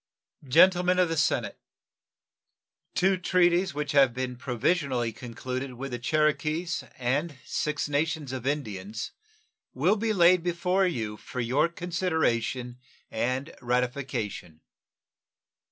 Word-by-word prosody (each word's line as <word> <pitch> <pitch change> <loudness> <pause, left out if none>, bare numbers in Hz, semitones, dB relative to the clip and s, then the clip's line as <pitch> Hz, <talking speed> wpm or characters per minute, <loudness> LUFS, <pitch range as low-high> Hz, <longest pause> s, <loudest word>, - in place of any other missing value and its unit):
Gentlemen 180 +5 +5
of 180 -2 +3
the 165 - -1
Senate: 150 - 0 1.4
Two 190 +1 +3
treaties 180 -2 +2
which 145 -1 -2
have 135 -4 +4
been 130 -1 -3
provisionally 125 -1 0
concluded 130 +3 -5
with 135 +2 -6
the 120 - -3
Cherokees 155 +5 0
and 140 +5 -1
Six 150 0 -1
Nations 150 -1 -1
of 130 -1 -5
Indians 110 -7 -3 0.6
will 215 - +3
be 225 +1 0
laid 180 -2 +5
before 180 +2 +1
you 110 -10 -3
for 125 - -7
your 130 +7 +2
consideration 160 -9 -1 0.3
and 130 +7 -2
ratification. 125 - -2
140 Hz, 110 wpm, -27 LUFS, 125-170 Hz, 1.4 s, Gentlemen